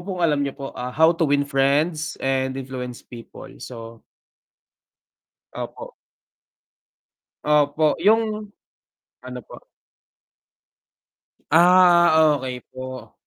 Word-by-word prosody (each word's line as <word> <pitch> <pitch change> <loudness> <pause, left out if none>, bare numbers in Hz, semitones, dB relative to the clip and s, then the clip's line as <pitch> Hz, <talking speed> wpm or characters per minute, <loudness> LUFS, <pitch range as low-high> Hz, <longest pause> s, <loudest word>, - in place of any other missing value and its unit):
po 195 - -13
kung 170 - +1
alam 150 -3 +1
niyo 140 -1 -4
po, 140 -1 -7
ah, 125 0 -5
How 160 +4 +4
to 165 -3 0
win 145 0 +2
friends 145 +3 0
and 130 0 -1
influence 125 -2 -7
people. 120 -2 -12
So 115 -2 -10 1.5
Opo. - - -8 1.5
Opo, 150 +1 +2
yung 215 +2 +1 0.7
ano 125 0 -8
po? - - -12 1.9
Ah, 170 -2 +5
okey 125 -1 -6
po. 130 -3 -9
145 Hz, 100 wpm, -22 LUFS, 130-165 Hz, 1.9 s, Ah